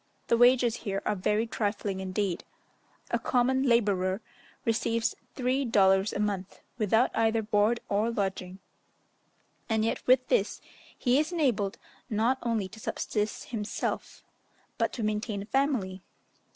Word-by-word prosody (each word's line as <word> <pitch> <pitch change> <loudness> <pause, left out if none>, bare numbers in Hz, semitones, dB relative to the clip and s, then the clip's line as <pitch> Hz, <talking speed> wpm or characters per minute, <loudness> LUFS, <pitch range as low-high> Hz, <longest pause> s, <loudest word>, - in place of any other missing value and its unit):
The - - +5
wages 245 -1 +5
here 200 -2 -3
are 210 - +1
very 210 +4 +1
trifling 205 -3 -2
indeed; 190 -1 -2 0.7
a - - +1
common 260 +1 +2
labourer 200 -7 +2 0.5
receives 230 0 +1 0.2
three 260 +1 +1
dollars 195 -4 +4
a - - -4
month, 200 -3 -2 0.2
without 220 +3 +3
either 225 0 +2
board 215 +2 +2
or 210 +3 +1
lodging; 190 -4 -3 1.1
and 220 -1 +2
yet 225 - -1
with 255 0 +5
this, - - +1 0.4
he 255 +1 +3
is 310 +3 0
enabled 240 - 0 0.3
not 230 +5 +1
only 225 -5 -1
to 220 - -12
subsist 210 0 -3
himself, 215 -3 -4 0.6
but - - +1
to 235 - -4
maintain 210 -1 -2
a - - -10
family. 225 -8 0
220 Hz, 135 wpm, -29 LUFS, 200-240 Hz, 1.1 s, The